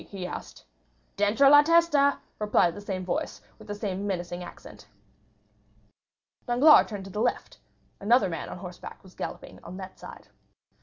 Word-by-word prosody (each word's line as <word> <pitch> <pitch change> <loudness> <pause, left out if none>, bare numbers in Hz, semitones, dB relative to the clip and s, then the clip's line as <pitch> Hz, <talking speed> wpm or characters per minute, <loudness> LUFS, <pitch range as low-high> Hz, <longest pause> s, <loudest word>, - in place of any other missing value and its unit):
he 190 -3 -6
asked. - - -8 0.5
"Dentro 210 +7 +3
la 290 +1 +9
testa," 300 -3 +3 0.2
replied 210 -5 +2
the 205 - -9
same 190 -2 -5
voice, 180 - -3 0.2
with - - -14
the 205 - -5
same 200 -1 -4
menacing 175 -2 -4
accent. 175 - -13 1.6
Danglars 265 +6 +6
turned 205 -3 -7
to 195 - -10
the 210 - -3
left; 245 - -2 0.4
another 215 0 +3
man 165 -4 -5
on - - -7
horseback 180 -1 -10
was 190 -1 -16
galloping - - -8
on 185 - -9
that 190 -1 -10
side. - - -12
205 Hz, 155 wpm, -27 LUFS, 185-245 Hz, 1.6 s, la